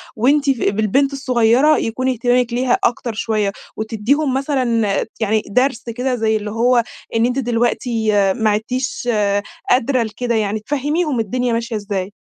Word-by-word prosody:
وأنتِ 275 +5 +2
ف 265 - +2
بالبنت 220 +7 +1
الصغيرة 255 +2 +3
يكون 255 +3 -1
اهتمامِك 245 0 +1
ليها 250 +1 +2
أكتر 235 -1 0
شوية، 215 -2 -1 0.3
وتديهم 235 +6 0
مثلًا 255 -5 0
آآ، - - -2
يعني 220 0 +1
درس 250 +3 +1
كده 250 +2 -1
زي 220 -2 +1
اللي 210 0 -5
هو 235 +2 +3 0.3
إن 225 +1 +3
أنتِ 250 +2 0
دلوقتي 235 -2 0 0.2
ما 220 -3 +1
عِدتيش 245 +4 -2 0.6
قادرة 255 0 +2
لكده 230 +2 -3
يعني 215 0 0
تفهميهم 290 +3 -1
الدنيا 245 +3 -1
ماشية 230 0 -2
إزاي. 200 -2 -3
240 Hz, 145 wpm, -18 LUFS, 220-260 Hz, 0.6 s, الصغيرة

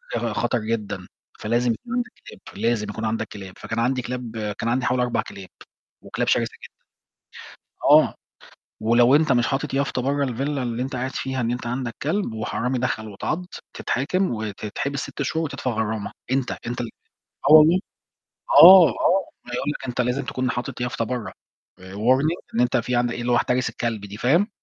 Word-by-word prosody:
أخا 115 -2 -1
خطر 120 +3 0
جدًا، 105 -4 -3 0.3
فلازم 120 +2 +1
يكون 240 - -9
عندَك 245 -1 -1 0.2
كلاب، - - -12 0.2
لازم 115 -3 0
يكون 110 +2 -4
عندَك 110 0 -1
كلاب. 95 -3 -9
فكان 110 +1 -4
عندي 125 +2 +1
كلاب 120 -2 -6 0.2
كان 115 - -1
عندي 125 +1 0
حوالي 125 0 +1
4 120 - 0
كلاب، 95 -2 -10 0.5
وكلاب - - -3
شرسة - - +2
جدًا. - - -8 1.1
آه، - - +6 0.7
ولو 120 +4 +4
أنت 155 -2 +4
مش 120 -1 +3
حاطِط 135 0 -2
يافطة 140 -2 0
برة 140 +1 0
الvilla 125 0 -5 0.2
اللي 120 -1 -2
انت 130 0 -4
قاعد 130 +2 -2
فيها 130 -1 -3
إن 115 0 0
انت 120 -1 -3
عندك 120 -1 -3
كلب، 160 - -1
وحرامي 125 +3 -2
دخل 110 -3 -2
واتعضّ، 155 - -3 0.3
تتحاكم، 185 +9 0
وتتحبس 110 +6 -4
6 145 - -5
شهور، 160 +4 -1
وتدفع 130 -3 -3
غرامة.أنت 110 +4 -2 0.2
أنت 120 0 -3
ال 120 - -4 0.6
آه - - +8
والله. 155 +4 +8 0.7
آه، 185 - +10
آه، 185 - +1 0.2
ما 125 - -10
يقول 145 - -1
لَك 140 - -5
أنت 125 - -2
لازِم 125 +3 0
تكون 130 -1 -2
حاطِط 120 +1 -4
يافطة 125 -2 -1
برّه، 125 -1 -4 0.5
warning 125 - +1 0.2
إن 120 - +1
أنت 125 0 +2
في 120 +1 0
عندَك 120 0 +1
اللي 120 0 -1
هو - - +4
احترس 125 +1 +1
الكلب 115 -3 -3
دي، 100 0 -9
فاهِم. 165 - +2
125 Hz, 180 wpm, -23 LUFS, 115-135 Hz, 1.1 s, آه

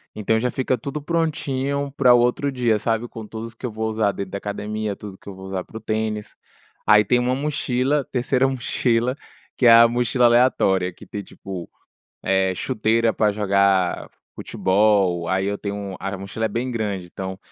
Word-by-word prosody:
Então, 110 +1 +1
já 125 - 0
fica 130 -1 0
tudo 140 +6 -5
prontinho 140 -4 -1
para 130 -2 +5
o 120 - +6
outro 125 +4 +1
dia, 120 -4 +1
sabe, 115 +2 -1
com 115 -2 -9
tudo 115 +1 -7
que - - -7
eu - - -6
vou 110 +1 -3
usar 110 -2 +1
dentro 100 -1 -6
da 100 - -3
academia, 105 0 -4
tudo 100 -2 -9
que - - -22
eu 95 - -8
vou 95 0 -10
usar 95 -1 -4
para - - -10
o - - -6
tênis. 110 -1 -3 0.5
Aí 105 0 +7
tem 125 +5 +3
uma 125 +1 +1
mochila, 140 -1 0
a - - -8
terceira 130 +1 +1
mochila, 125 -1 0 0.4
que 125 - +1
é 115 - +9
a 115 0 +8
mochila 120 +1 +1
aleatória, 120 -6 +3
que - - -14
tem, 100 -1 -6
tipo, 95 -3 -8 0.5
eh, 95 0 +2
chuteira 115 0 +1
pra 105 -1 +2
jogar 100 -3 +1 0.3
futebol, 95 -3 +1
aí 95 +2 0
eu 100 0 -1
tenho 100 -2 -5
a 100 +1 -4
mochila 100 +4 -4
é - - +2
bem 120 +4 -3
grande, 105 -5 -3
então 95 +2 -6
110 Hz, 190 wpm, -22 LUFS, 100-125 Hz, 0.5 s, é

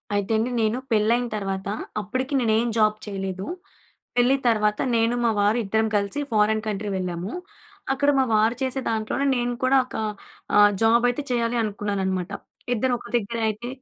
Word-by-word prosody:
అయితే 205 +2 -1
అండి 230 +3 0
నేను 220 +2 +1
పెళ్లి 215 0 +3
అయిన 245 0 -1
తర్వాత, 195 -1 -3 0.3
అప్పటికి 255 +7 -3
నేను 225 -3 +2
ఎం 235 +1 0
జాబ్ 215 -1 +4
చేయలేదు. 195 -2 -4 0.7
పెళ్లి 245 +2 +4
తర్వాత 210 -2 +2 0.2
నేను, 230 +1 +2
మా 230 - +3
వారు 205 +3 +3
ఇద్దరం 220 +2 +1
కలిసి 200 +6 0
ఫోరిన్ 215 0 +2
కంట్రీ 210 0 -2
వెళ్ళాము. 180 +2 -4 0.6
అక్కడ 285 +2 +1
మా 265 - +3
వారు 220 +3 +3
చేసే 265 0 -1
దాంట్లోనే 220 +5 -1
నేను 245 0 -1
కూడా 265 +1 +4
ఒక - - -11 0.6
ఆహ్, 205 0 +7
జాబ్ 230 +2 +4
అయితే 245 +4 -2
చేయాలి 235 0 0
అనుకున్నాను 205 -2 -2
అన్నమాట. 185 0 -2 0.4
ఇద్దరు 250 +3 +1
ఒక - - -11
దగ్గరే 230 +1 -3
అయితే 215 +3 -5
220 Hz, 170 wpm, -24 LUFS, 205-240 Hz, 0.7 s, ఆహ్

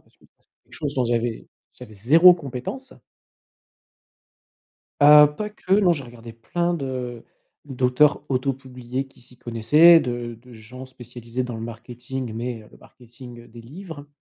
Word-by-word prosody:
parce - - -33
que - - -29 0.2
c'est - - -40 0.2
quelque - - -31
chose 145 -2 -5
dont 130 -2 0
j'avais 120 -1 -2 0.3
j'avais 110 - -13
0 165 - +6
compétence. 160 - -8 2.1
Ah, 150 +1 +8
pas 210 +9 -6
que, 195 -2 -3
non, 190 -4 +4
j'ai 140 -4 -6
regardé 120 -1 -12
plein 170 +10 -3
de 130 -5 -5 0.4
d'auteurs 135 +2 +1
auto-publiés 130 -1 -4
qui - - -24
s'y 125 0 -21
connaissaient, 125 +9 +5
de 120 -2 -5
de 125 -1 -17
gens 125 +4 -12
spécialisés 120 -1 -7
dans 120 -2 -6
le 110 - -8
marketing 120 +1 -7
mais, 115 0 -5
heu, 105 - -18
le - - -18
marketing, 120 0 -15
heu, - - -18
des 115 +1 -14
livres, 145 +2 -11
125 Hz, 155 wpm, -22 LUFS, 120-145 Hz, 2.1 s, Ah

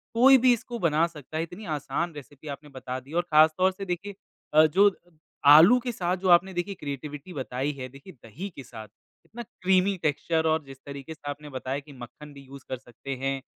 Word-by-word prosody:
कोई 265 +3 +7
भी 255 0 +5
इसको 240 +1 -5
बना 165 -3 +2
सकता 155 -2 -9
है, 160 - 0
इतनी 180 +6 -9
आसान 170 +4 -3
रेसिपी 145 +1 -12
आपने 145 +1 -8
बता 130 -1 -6
दी 130 +2 -19
है - - -6
और - - +4
ख़ास 155 +1 +7
तौर 185 +1 +3
से 195 +1 -8
देखिए 190 +2 -4 0.4
अ, 155 +1 +7
जो 195 +6 +4 0.6
आलू 185 +11 +8
के 245 0 -4
साथ 180 -4 -1
जो 185 +1 -1
आपने 180 +2 +5
देखिए 175 +3 -3
क्रिएटिविटी 145 +3 -7
बताई 135 0 -3
है 130 0 -6
देखिए 140 +8 -14
दही 130 - -9
के 135 - -8
साथ, 115 -3 -10 0.4
इतना 240 +2 -9
क्रीमी 190 -1 +1
टेक्सचर 160 +2 0
और 160 0 +1
जिस 135 -1 -11
तरीके 140 +2 -8
से 145 -2 -9
आपने 150 +1 -9
बताया 130 0 -4
कि 145 0 -14
मक्खन 145 +5 -11
भी 140 - -12
यूज़ 135 0 -12
कर 130 - -3
सकते 130 +2 -8
हैं 135 0 -1
155 Hz, 215 wpm, -26 LUFS, 140-185 Hz, 0.6 s, आलू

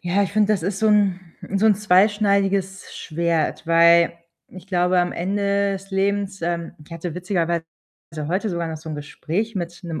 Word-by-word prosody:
ja, 185 +3 +1
ich 195 - -3
finde, 215 0 +3
das 195 -6 -1
ist 195 +2 -2
so 220 +1 +2
'n 205 -3 +3 0.4
so 215 - +3
'n 215 - +5
zweischneidiges 200 -1 +1
Schwert, 165 -1 -1
weil 170 0 +5 0.4
ich 185 -1 -13
glaube, 180 -1 +1
am 175 - -1
Ende 200 +2 0
des 195 +1 -7
Lebens, 195 0 -1
ähm 170 0 -2
ich 165 - -15
hatte 165 0 -5
witzigerweise 175 -2 -1 0.7
heute 190 +6 -1
sogar 170 -1 -3
noch 160 - -5
so 155 +1 -11
'n - - -4
Gespräch 165 +9 -4
mit 175 -2 -5
'nem 165 -3 -5
185 Hz, 180 wpm, -22 LUFS, 170-200 Hz, 0.7 s, n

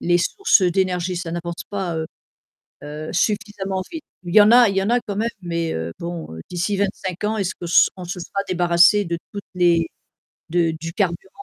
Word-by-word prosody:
les 175 0 +2
sources 305 - +3
d'énergie 180 0 0
ça 170 -1 -4
n'apporte 170 0 -5
pas, 190 -5 -3
heu 160 0 -2 0.8
heu, 150 +1 -7
suffisamment 200 -1 -1
vite. 325 -2 -6 0.2
Il 175 -1 -5
y 215 - +10
en 205 +2 +6
a 240 -1 +8
il 195 - -3
y 195 - +2
en 200 - -1
a 245 - +3
quand 205 -4 -6
même, 225 +3 0
mais 170 -2 -2 0.3
bon, 170 -1 -5 0.2
d'ici 180 +3 -1
25 190 -2 -3
ans, 215 +1 0
est-ce 195 -3 -2
qu'on 175 - -7
se 170 - +5
on 185 - -8
se 175 +1 -5
sera 200 +3 -3
débarrassé 175 +3 +4
de 170 -1 -2
toutes 200 -1 -6
les 170 -2 +3 0.6
de 170 -1 +2
du 165 +1 -5
carburant 185 -1 -1
180 Hz, 200 wpm, -21 LUFS, 170-200 Hz, 0.8 s, y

